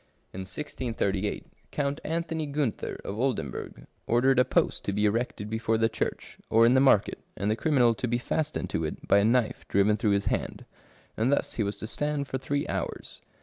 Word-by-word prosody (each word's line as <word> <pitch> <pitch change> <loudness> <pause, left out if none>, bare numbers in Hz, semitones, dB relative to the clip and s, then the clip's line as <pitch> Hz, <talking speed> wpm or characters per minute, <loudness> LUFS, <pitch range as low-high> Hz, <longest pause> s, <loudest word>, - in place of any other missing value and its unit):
In 95 - -6
1638, 105 -5 -2 0.2
Count 145 0 -2
Anthony 165 -1 -2
Gunter 140 -6 -2
of 100 +3 -4
Oldenburg 120 - -3 0.2
ordered 125 +3 +4
a - - +7
post 130 - +1
to 100 - -1
be 105 +1 +1
erected 105 -1 -1
before 110 +1 0
the 115 0 +2
church, 110 - -4
or 115 +1 +5
in 120 - +5
the 130 - +5
market, 130 -7 +4 0.2
and 100 +2 0
the - - +2
criminal 125 -3 +3
to 125 - -3
be 120 +1 +1
fastened 155 +5 -2
to 80 - -1
it 75 - -5
by 100 - +5
a - - +3
knife 115 +1 +2
driven 100 +2 +3
through 105 -3 +2
his 100 - -4
hand; - - -2 0.5
and 115 +5 +1
thus 140 - +1
he - - -2
was 100 -1 -1
to - - -7
stand 145 +4 -2
for 130 - -3
three 145 +2 -2
hours. - - -4
115 Hz, 195 wpm, -28 LUFS, 105-140 Hz, 0.5 s, a